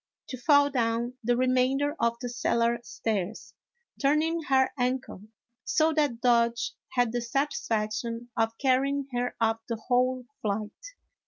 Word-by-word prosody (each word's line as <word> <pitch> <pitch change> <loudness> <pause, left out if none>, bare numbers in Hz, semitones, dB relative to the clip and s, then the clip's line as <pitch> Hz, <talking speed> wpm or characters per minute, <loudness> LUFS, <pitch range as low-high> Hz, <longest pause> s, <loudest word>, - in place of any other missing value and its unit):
to 260 - -6
fall 285 +3 +4
down 235 -1 0
the 240 +1 +2
remainder 255 +3 +2
of 235 0 +1
the 245 - -3
cellar 235 0 +1
stairs, 215 -3 -4 0.5
turn 295 +2 +3
ing 330 +1 -1
her 265 -3 +2
ankle, 250 -5 -2 0.4
so 315 +1 +2
that 290 -7 0
Dodge 235 -1 +2 0.2
had 245 -3 +2
the 240 +1 -1
satisfaction 230 -3 -2
of 225 0 0
carrying 275 +1 +1
her 245 0 -1
up 225 0 +1
the 230 - 0
whole 250 +2 0 0.2
flight. 210 0 -2
245 Hz, 140 wpm, -28 LUFS, 230-270 Hz, 0.5 s, fall